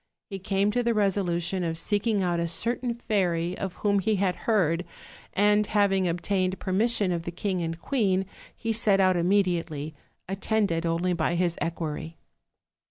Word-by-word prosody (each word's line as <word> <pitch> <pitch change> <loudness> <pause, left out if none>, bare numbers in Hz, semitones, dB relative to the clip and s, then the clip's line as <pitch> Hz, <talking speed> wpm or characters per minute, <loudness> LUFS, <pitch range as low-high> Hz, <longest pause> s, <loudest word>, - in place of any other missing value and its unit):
He 195 - -4
came 195 +2 +1
to 245 - +1
the 235 -1 0
resolution 190 -3 0
of 165 -1 -2
seeking 205 +3 0
out 175 -1 0
a 170 - 0
certain 235 +7 -1
fairy 180 -6 0
of 190 -2 -3
whom 200 -1 +3
he 215 +3 +1
had 190 -2 +1
heard, 180 -6 +2 0.5
and 210 +1 +4
having 195 -3 +2
obtained 185 +2 -1
permission 205 0 +2
of 170 -1 -1
the 170 - -5
king 185 +1 -2
and 165 0 -3
queen 195 -6 +1 0.3
he 225 -1 -2
set 210 -3 +3
out 185 -1 +4
immediately, 170 -5 0 0.3
attended 195 -3 0
only 170 +2 0
by 170 0 0
his 175 -1 +1
equerry. 165 -1 -4
185 Hz, 160 wpm, -26 LUFS, 170-205 Hz, 0.5 s, and